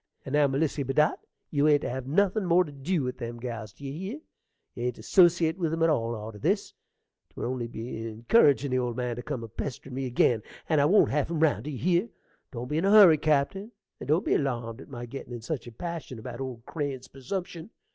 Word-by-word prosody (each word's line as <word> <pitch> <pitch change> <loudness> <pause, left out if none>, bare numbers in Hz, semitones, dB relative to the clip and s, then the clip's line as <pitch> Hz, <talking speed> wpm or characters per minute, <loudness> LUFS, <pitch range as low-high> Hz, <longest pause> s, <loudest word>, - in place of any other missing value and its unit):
And 135 - -6
now, 145 -1 +5
Melissy 140 +2 0
Bedott, 140 +3 +2 0.3
you 145 0 +3
ain't 145 -1 +4
to - - -2
have 130 0 -5
nothin' 200 +7 +2
more 180 0 +4
to 155 - -9
dew 145 +3 -1
with 125 0 -4
them 120 -1 -5
gals, 115 -4 -6
d'ye 135 +5 -8
hear? 190 - -5 0.5
You 120 - -4
ain't 125 -1 -1
to - - -12
'sociate 175 -2 +4
with 165 -3 0
'em 165 0 0
at 165 - +4
all 115 -5 0
arter 105 -1 -8
this: 195 - 0 0.6
'twould - - -6
only 125 -1 -2
be 115 0 -6
incurridgin' 135 - +3
the 130 - +2
old 120 -1 -2
man 125 -1 -2
to - - -4
come 130 -3 -4
a - - -6
pesterin' 130 +4 -6
me 135 0 -2
ag'in; 120 -2 +2 0.3
and 155 -3 +3
I - - +4
won't 200 +7 +5
have 150 +1 0
him 165 -2 -2
round, 145 -7 +2
d'ye 150 -3 -4
hear? 180 - +1 0.4
Don't 120 -1 -5
be 150 +4 0
in 175 - 0
a - - +3
hurry, 195 -7 +8
cappen, 155 +9 0 0.3
and - - -8
don't 160 +8 +2
be - - +2
alarmed 120 -5 -1
at - - -13
my 120 -3 -6
gettin' 125 0 -8
in 120 - -6
such 130 +2 -4
a - - -8
passion 165 -1 -6
about 120 +3 -7
old 125 -3 -6
Crane's 140 -5 -4
persumption. 170 - -6
140 Hz, 230 wpm, -28 LUFS, 120-165 Hz, 0.6 s, hurry